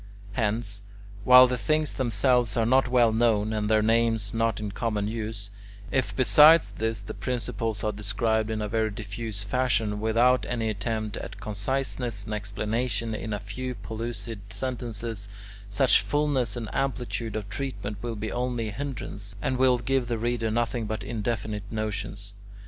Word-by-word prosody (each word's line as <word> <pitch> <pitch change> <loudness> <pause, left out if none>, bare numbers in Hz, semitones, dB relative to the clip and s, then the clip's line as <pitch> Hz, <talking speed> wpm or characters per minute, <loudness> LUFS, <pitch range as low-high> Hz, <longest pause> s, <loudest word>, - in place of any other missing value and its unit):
Hence, 105 -1 -1 0.4
while 125 +1 +10
the 125 -1 -1
things 155 +1 +1
themselves 120 -1 +2
are 115 - +3
not 130 +3 +4
well 120 -3 +4
known, 110 -2 +2
and 105 -1 -1
their 110 -1 +4
names 115 -2 +2
not 115 -2 +1
in 105 -1 -4
common 105 -2 -1
use, 110 -2 -5 0.4
if 130 -1 0
besides 150 +5 +7
this 115 -2 -2
the - - -6
principles 115 -3 -3
are 105 - +1
described 105 +2 0
in 110 -1 -2
a - - -2
very 110 +1 +1
diffuse 105 0 -5
fashion 110 -2 0
without 120 +3 +3
any 115 -2 0
attempt 110 0 -3
at 105 -1 -7
conciseness 110 +1 -2
and 110 - -4
explanation 105 +2 -2
in 110 0 -4
a 105 - -1
few 125 +5 -5
pellucid 115 +2 -5
sentences, 115 -4 -5 0.4
such 125 +6 +4
fullness 145 -7 0
and 115 -2 -4
amplitude 125 -4 -2
of 105 -2 -3
treatment 125 -7 -4
will 115 0 -3
be 110 +1 -4
only 120 -2 -1
a - - -6
hindrance, 105 -5 -6
and 130 - -1
will 130 -1 +4
give 125 +1 0
the 120 -2 -1
reader 115 0 -1
nothing 115 0 -1
but 110 +1 -3
indefinite 105 -3 -3
notions. 105 -2 -4
115 Hz, 160 wpm, -27 LUFS, 105-125 Hz, 0.4 s, while